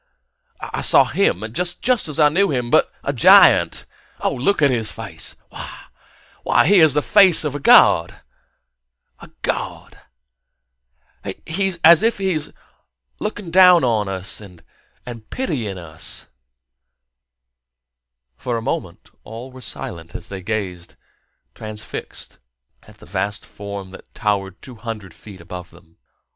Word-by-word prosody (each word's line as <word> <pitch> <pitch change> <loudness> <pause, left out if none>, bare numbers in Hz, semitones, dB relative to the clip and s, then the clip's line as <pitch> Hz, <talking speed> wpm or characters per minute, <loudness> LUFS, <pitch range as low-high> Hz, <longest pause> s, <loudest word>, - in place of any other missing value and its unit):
I - - -5
saw - - +6
him 200 - 0
just 180 - -4
as 225 - 0
I 150 -1 +6
knew 195 +6 +2
him 125 -4 -2
but - - +3
a - - -2
giant! - - +5 0.4
Look 140 +7 +1
at 140 - +5
his 115 -3 -1
face! 100 -8 -8 1.1
Why, - - +3
he 200 -1 +5
has 160 -4 +5
the 150 - +1
face 195 -6 +5
of 150 -3 -2
of - - -3
a 60 - +1 0.2
god! - - -4 1.5
He's 190 +2 -1
as 170 0 +8
if 230 +1 +1
he 190 -3 -1
were 155 -1 -2 0.7
looking 205 -4 -5
down 180 -2 +7
on 110 -5 +1
us 95 +1 -4
and 90 -5 -14 0.7
pitying 125 - -3
us...." 80 -2 -6 2.1
For 120 - -3
a - - -4
moment - - -5 0.2
all 115 +4 -9
were 130 0 -13
silent 85 -8 -4
as - - -8
they 95 -1 -7
gazed, 90 -4 -4 0.6
transfixed, 110 0 -8 0.5
at - - -17
the - - -16
vast 100 +2 -3
form 100 -2 -8
that - - -14
towered 100 -2 -2
two 125 -3 -11
hundred 110 -6 -7
feet 100 -1 -13
above 90 +1 -9
them. 85 -1 -21
115 Hz, 130 wpm, -20 LUFS, -, 2.1 s, as